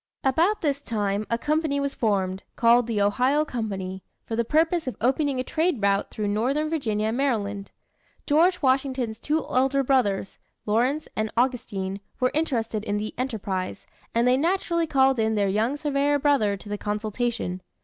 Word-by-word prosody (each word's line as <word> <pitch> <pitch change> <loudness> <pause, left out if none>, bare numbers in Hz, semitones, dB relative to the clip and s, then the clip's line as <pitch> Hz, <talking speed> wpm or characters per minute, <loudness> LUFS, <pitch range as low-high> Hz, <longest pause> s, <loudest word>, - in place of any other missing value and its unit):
About 335 +10 +2
this 285 -3 0
time, 210 -4 -2
a 230 - +1
company 300 +1 0
was 280 0 -1
formed, 190 -4 0
called 235 0 +4
the 225 -3 -1
Ohio 255 +9 +2
Company, 195 -7 -4 0.2
for 225 - -3
the 235 - +1
purpose 320 +5 +1
of 255 - -4
opening 270 +2 +1
a - - 0
trade 320 0 0
route 200 0 +1
through 210 -1 -3
northern 265 +9 0
Virginia 220 -9 0
and 230 - -2
Maryland. 205 -7 -1 0.5
George 330 +4 +3
Washington's 260 -4 +1
two 305 +4 -1
elder 270 +2 +2
brothers, 210 -8 +1 0.3
Lawrence 250 +8 +1
and 215 0 -1
Augustine, 225 -6 -1 0.2
were 255 -1 +2
interested 235 -9 -1
in 205 -1 -1
the 215 +1 -4
'enterprise'; 210 -7 -3 0.3
and 235 +1 +3
they 250 +1 +4
naturally 335 +1 0
called 265 -3 +3
in 220 0 +1
their 200 -1 +2
young 220 +8 0
surveyor 290 -1 +1
brother 270 -9 +2
to 205 +1 -6
consultation. 210 -2 -2
245 Hz, 160 wpm, -25 LUFS, 210-280 Hz, 0.5 s, called